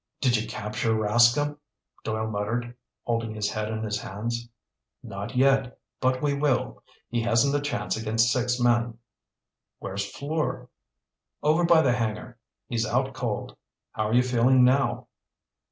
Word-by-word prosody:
"Did 125 -3 +3
you 110 - -1
capture 110 +2 -2
Rascomb?" 120 +7 +3 0.4
Doyle 110 0 -2
muttered, 110 +3 -3 0.3
holding 115 -2 -2
his 105 -1 -1
head 110 0 -3
in 110 0 -3
his 105 -1 -2
hands. 115 +4 -4 0.5
"Not 100 +6 -6
yet. 135 -1 +3 0.2
But 130 +1 +1
we 145 -1 +2
will. 140 -3 0 0.3
He 120 -1 0
hasn't 120 +5 +2
a 145 - +1
chance 145 -10 -2
against 115 +1 +2
six 125 0 0
men." 120 -1 +2 0.8
"Where's 100 +1 -4
Fleur?" 150 +2 -3 0.7
"Over 160 +3 +3
by 170 -2 +5
the 125 -4 +3
hangar. 120 +1 -3 0.3
He's 115 -2 -1
out 130 +3 0
cold. 115 -5 -4 0.4
How 110 0 -1
are - - -1
you 125 - +5
feeling 125 +1 +4
now?" 130 +2 +2
120 Hz, 145 wpm, -26 LUFS, 110-130 Hz, 0.8 s, by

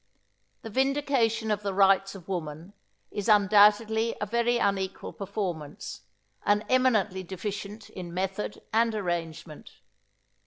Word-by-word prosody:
The 225 - -7
Vindication 260 -4 +1
of 210 0 0
the 200 -2 -3
Rights 195 0 +4
of 180 -3 -12
Woman 170 0 -5 0.4
is 205 +1 -3
undoubtedly 210 +2 +5
a - - -1
very 235 +3 +1
unequal 195 -4 -1
performance, 185 -7 -5 0.4
and 205 +1 +2
eminently 220 -7 +2
deficient 200 +3 -6
in 180 -2 -7
method 190 +3 -3
and 225 0 +3
arrangement. 170 -5 -4
205 Hz, 115 wpm, -28 LUFS, 190-220 Hz, 0.4 s, undoubtedly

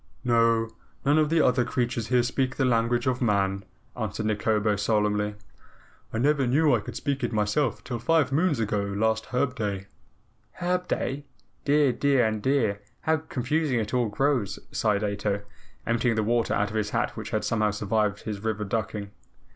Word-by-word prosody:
"No, 115 -1 +3 0.4
none 145 +3 +4
of 155 -1 +2
the 165 -1 +3
other 125 0 +3
creatures 120 -2 -1
here 125 -1 +3
speak 130 +1 -1
the 135 - +1
language 120 0 +2
of 130 0 0
man," 100 -4 +1 0.3
answered 110 -2 -3
Nikobo 105 0 +1
solemnly. 105 0 0 0.8
"I - - -3
never 140 +2 +2
knew 145 +3 +4
I 120 - +3
could 105 - -8
speak 140 +1 -2
it 120 - 0
myself 110 +4 0
till 120 -2 -4
five 160 +3 +2
moons 155 -1 +2
ago 105 -2 0
last 110 +3 0
Herb 125 +1 0
Day." 100 -5 -3 0.7
"Herb 180 0 -1
Day? 140 +2 -2 0.4
Dear, 145 -1 +4
dear 135 0 +2
and 110 -1 -1
dear! 110 -6 +1 0.2
How 160 0 +2
confusing 145 -2 -1
it 110 +1 -3
all 120 -3 +2
grows," 115 -4 0
sighed 105 -2 +1
Ato, 100 0 -1 0.4
emptying 115 0 +1
the 110 - +1
water 115 +1 +1
out 105 0 0
of - - -7
his 105 -1 0
hat 115 +2 0
which 110 -2 -6
had 110 - -1
somehow 110 -2 +1
survived 105 0 0
his 105 -2 -5
river 110 -1 -1
ducking. 105 -1 -3
115 Hz, 175 wpm, -26 LUFS, 105-130 Hz, 0.8 s, none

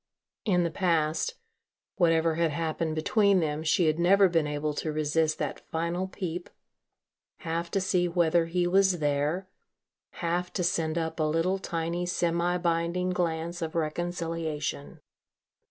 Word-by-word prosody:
In 180 -5 +3
the 170 - -1
past, 165 - 0 0.6
whatever 165 -2 +3
had 165 0 +1
happened 160 +1 -2
between 200 +4 +3
them, 155 -2 -1
she 165 +2 +2
had 155 +1 +1
never 195 +3 +5
been 165 -4 +1
able 150 +1 -2
to 155 +1 -3
resist 155 +1 +1
that 150 -3 -3
final 170 +3 -1
peep, 180 -2 -5 0.9
half 170 0 -3
to 195 - 0
see 185 -2 +1
whether 170 -1 +2
he 175 +1 0
was 190 0 +3
there, 150 +5 0 0.7
half 175 +1 -2
to 180 - -1
send 165 -2 0
up 160 0 -2
a - - +2
little 165 +5 +1
tiny 170 -1 -2
semi 175 0 +1
binding 170 +1 0
glance 170 0 -2
of 160 0 -4
reconciliation. 165 -2 -3
170 Hz, 140 wpm, -28 LUFS, 160-180 Hz, 0.9 s, never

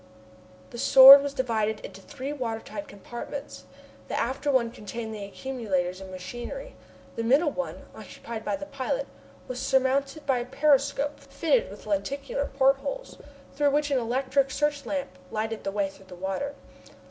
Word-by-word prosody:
The 240 - -8
Sword 270 +1 +11
was 285 0 -2
divided 220 -5 -1
into 195 - -10
three 280 +3 -6
water 235 -6 -3
tight 300 +6 -8
compartments. 240 +7 -8 0.4
The - - -2
after 270 +5 -1
one 240 -4 +2
contained 220 +1 -6
the 210 -2 -6
accumulators 200 -6 -3
and 190 - -9
machinery. 240 - -7 0.4
The 230 - -2
middle 285 +7 +3
one, 275 - -5
occupied 230 -1 -8
by - - -1
the 290 0 -7
pilot, 290 - -2 0.4
was 250 -1 -5
surmounted 270 +2 +1
by 265 -3 +2
a 240 - -4
periscope 285 +1 +2
fitted 330 - 0
with - - -11
lenticular 280 -1 -2
portholes, 275 - 0 0.3
through 290 +1 +2
which 290 +1 +1
an 270 - +3
electric 260 +3 +1
search 290 -1 -1
lamp 280 0 -4
lighted 220 +1 -3
the 195 - -2
way 200 -1 0
through 195 0 -15
the 185 -1 -11
water. 195 +11 -3
265 Hz, 160 wpm, -27 LUFS, 225-285 Hz, 0.4 s, Sword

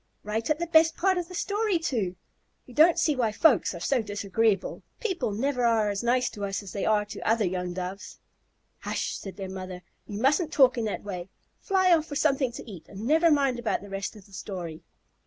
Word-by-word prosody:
Right 220 +2 -2
at 305 - +2
the 345 - -2
best 325 -1 +4
part 375 0 +2
of 345 - -4
the 365 - -9
story, 410 0 0
too. 225 - -2 0.5
We 250 - -14
don't 320 +6 +6
see 320 -4 +2
why 235 -4 +1
folks 215 - +3
are - - -6
so 250 +8 +1
disagreeable. 205 0 0 0.2
People 370 - -1
never 250 +4 -1
are 225 -3 +3
as 200 - -3
nice 250 +1 +2
to 205 - -7
us 200 +1 -2
as 195 - -9
they 200 - -2
are 210 -1 +3
to 205 - -8
the - - -7
other 225 -1 +3
young 180 0 -2
Doves." 185 +2 -6 0.6
"Hush," - - -3
said 195 0 -8
their 195 -2 -5
mother. 185 -1 -7 0.2
"You 205 -1 -5
mustn't 300 - +2
talk 260 -3 +5
in 230 -2 -1
that 210 - -3
way. 185 -3 -6 0.3
Fly 375 -3 +3
off 315 -1 -2
for 290 - -6
something 275 -3 +2
to - - -9
eat, 185 -7 -10
and 200 0 -9
never 320 +5 +4
mind 275 -5 +2
about 240 - -1
the 205 - -10
rest 195 +2 -4
of 205 -3 -14
the 200 - -20
story." 175 -5 -6
225 Hz, 225 wpm, -27 LUFS, 200-305 Hz, 0.6 s, don't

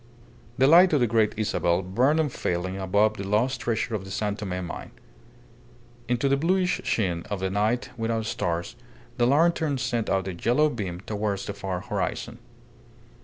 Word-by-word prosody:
The 130 - +4
light 170 +4 +7
of 150 - +4
the 120 - +3
Great 110 -2 +2
Isabel 95 -4 +1
burned 125 - +2
unfailing 95 - -2
above 100 +3 +2
the 100 - -4
lost 115 +6 0
treasure 115 +1 -1
of 105 -3 -2
the 95 - -10
San 105 +1 -2
Tome 90 -3 -4
mine. 85 - -7 1.2
Into 125 +3 +1
the 135 - +3
bluish 180 +4 +1
sheen 90 -6 0
of 100 -2 -3
a 95 - 0
night 110 +5 0
without 115 -1 -1
stars 85 0 -2 0.4
the 120 -1 +3
lantern 155 0 +2
sent 120 -3 -1
out 95 -1 0
a 95 - -3
yellow 125 - +2
beam 95 -7 -5
towards 105 -1 -3
the 100 - -4
far 95 -2 -4
horizon. - - -3
110 Hz, 170 wpm, -26 LUFS, 95-125 Hz, 1.2 s, light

